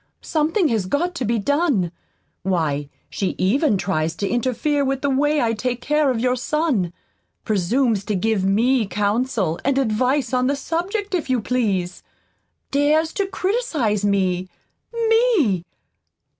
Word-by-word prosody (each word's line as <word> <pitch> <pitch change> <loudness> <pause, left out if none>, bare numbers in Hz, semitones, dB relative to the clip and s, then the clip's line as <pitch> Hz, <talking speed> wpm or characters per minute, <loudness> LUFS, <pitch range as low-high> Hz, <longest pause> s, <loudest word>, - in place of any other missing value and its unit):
Something 325 +4 +1
has 215 -6 0
got 345 - 0
to 265 -7 -3
be 230 +2 +1
done. 275 - +1 0.5
Why, 155 -6 -1 0.2
she 195 - -3
even 230 - +2
tries 165 -4 -1
to 200 - -2
interfere 260 +5 0
with 270 0 -1
the 280 - +2
way 295 +3 +2
I 230 -1 +1
take 245 +2 -2
care 300 +2 +1
of 250 -3 0
your 250 +1 +1
son 255 - 0 0.5
presumes 215 +2 +1
to 210 - -1
give 210 +1 0
me 225 +4 +2
counsel 205 -4 0
and 275 0 +1
advice 255 +1 +1
on 250 0 +2
the 280 - +1
subject, 380 +8 -3
if 340 -7 -1
you 255 -1 +2
please. 200 -7 -1 0.7
Dares 300 +3 +2
to 400 -2 -1
criticize 370 - -1
me 185 -2 +1 0.4
ME! 450 - +2
250 Hz, 145 wpm, -21 LUFS, 200-300 Hz, 0.7 s, even